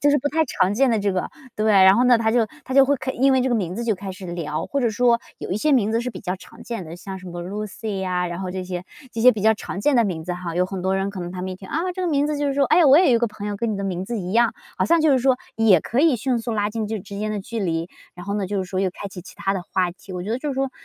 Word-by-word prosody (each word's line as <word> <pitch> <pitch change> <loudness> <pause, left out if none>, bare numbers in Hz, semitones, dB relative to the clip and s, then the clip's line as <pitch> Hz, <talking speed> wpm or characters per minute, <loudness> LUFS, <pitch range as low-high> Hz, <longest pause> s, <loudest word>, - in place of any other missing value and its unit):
就 290 - +3
是 290 - +4
不 285 - -1
太 320 +2 +2
常 185 -9 +1
见 265 +6 +3
的 225 - +2
这 200 -1 0
个。 185 - -2 0.3
对， 215 0 +2
然 190 0 +7
后 245 - +3
呢， 250 -1 +6
他 225 -1 +1
就 230 -1 +3 0.2
他 - - -6
就 270 0 +7
会 285 - +2
开 260 - -4
因 270 +2 +3
为 260 - +3
这 260 - +1
个 245 - +1
名 185 -5 -1
字 235 - -3
就 220 - +1
开 190 0 -6
始 185 0 -9
聊。 160 -3 -3
或 280 - -1
者 240 - +2
说 235 +2 +3 0.2
有 - - -6
一 190 - 0
些 300 +7 +2
名 220 -5 +3
字 230 - +1
是 250 - -3
比 - - -9
较 180 - -2
常 230 +5 -14
见 230 -7 -5
的， 160 - -8
像 190 +1 -7
什 185 - -12
么 175 -1 -6
Lucy 205 +2 -5
呀， 180 -1 -1
然 175 - -5
后 185 - -4
这 185 -1 -4
些 180 -1 -5 0.3
这 225 - -4
些 250 +2 +7
比 210 - -5
较 220 +1 +5
常 200 -2 -6
见 280 +3 +3
的 235 - +4
名 175 -6 -3
字 180 - -3
哈， 175 -2 -5
有 180 +1 +2
很 185 0 -5
多 190 +1 +1
人 195 +1 -1
可 200 - -8
能 175 0 -5
他 180 -1 -5
们 185 - -3
一 185 - -6
听， 190 0 -12
啊， 310 - -1 0.2
这 370 - -5
个 - - 0
名 290 -1 +2
字 300 -1 -1
就 290 - 0
是 275 - 0
说： 280 - +3
“诶， 350 - +6
我 275 -1 +7
也 365 - +5
有 235 - +5
一 - - +2
个 235 - +1
朋 210 -1 -7
友 205 - -3
跟 230 0 -1
你 - - -3
的 200 - -4
名 185 -1 -3
字 235 +1 -3
一 180 0 -5
样”， 235 +1 +3 0.2
好 - - +2
像 335 0 +3
就 310 -1 +4
是 265 - +4
说 260 0 +3 0.2
也 210 -7 +5
可 235 - -3
以 315 -2 +5
迅 250 +1 0
速 230 +1 -4
拉 205 -1 0
近 220 -1 -3
这 220 0 -3
之 200 +1 -8
间 215 0 -2
的 210 - -3
距 230 +4 -6
离。 165 -4 -1 0.3
然 180 - -9
后 200 - -3
呢， 205 -2 -1
就 200 +1 -2
是 190 - -1
说 185 - -2
又 190 0 +2
开 200 +2 -7
启 190 -1 -9
其 180 - -13
它 195 - -1
的 190 -3 -3
话 180 0 0
题， 190 +2 -12
我 180 -1 -4
觉 210 - -5
得 235 - 0
就 295 +2 -4
是 275 - -2
说 270 0 -1
210 Hz, 390 characters per minute, -22 LUFS, 185-245 Hz, 0.3 s, 然